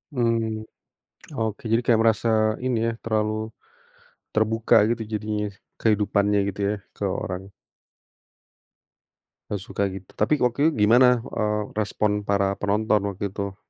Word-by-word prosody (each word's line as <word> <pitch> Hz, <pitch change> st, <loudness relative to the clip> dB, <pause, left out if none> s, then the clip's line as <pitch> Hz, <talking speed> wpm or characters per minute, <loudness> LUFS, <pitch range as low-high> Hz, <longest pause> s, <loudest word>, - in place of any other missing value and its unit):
Mmm, 115 Hz, -2 st, 0 dB, 0.7 s
oke, 110 Hz, -3 st, -2 dB
jadi 115 Hz, +1 st, +3 dB
kayak 115 Hz, -2 st, +4 dB
merasa 115 Hz, +1 st, +2 dB, 0.4 s
ini 130 Hz, -2 st, +1 dB
ya, 115 Hz, -, 0 dB
terlalu, 110 Hz, -1 st, 0 dB, 1.0 s
terbuka 110 Hz, +1 st, +2 dB
gitu 120 Hz, -1 st, -1 dB
jadinya 105 Hz, 0 st, -2 dB, 0.4 s
kehidupannya 105 Hz, -1 st, +2 dB
gitu 100 Hz, -, -8 dB
ya 105 Hz, -, 0 dB, 0.2 s
ke -, -, -6 dB, 0.2 s
orang. 95 Hz, +1 st, -5 dB, 2.0 s
Gak 100 Hz, -3 st, -3 dB
suka 105 Hz, -3 st, -3 dB
gitu 95 Hz, 0 st, -9 dB
tapi 110 Hz, +8 st, +1 dB
waktu 125 Hz, +2 st, +1 dB
itu 165 Hz, -, +3 dB
gimana, 120 Hz, +2 st, +5 dB
eee, 105 Hz, -2 st, -2 dB
respon 105 Hz, 0 st, 0 dB
para 100 Hz, -1 st, +2 dB
penonton 105 Hz, +1 st, +2 dB
waktu 100 Hz, 0 st, -4 dB
itu? 100 Hz, -1 st, -4 dB
105 Hz, 125 wpm, -24 LUFS, 100-115 Hz, 2.0 s, gimana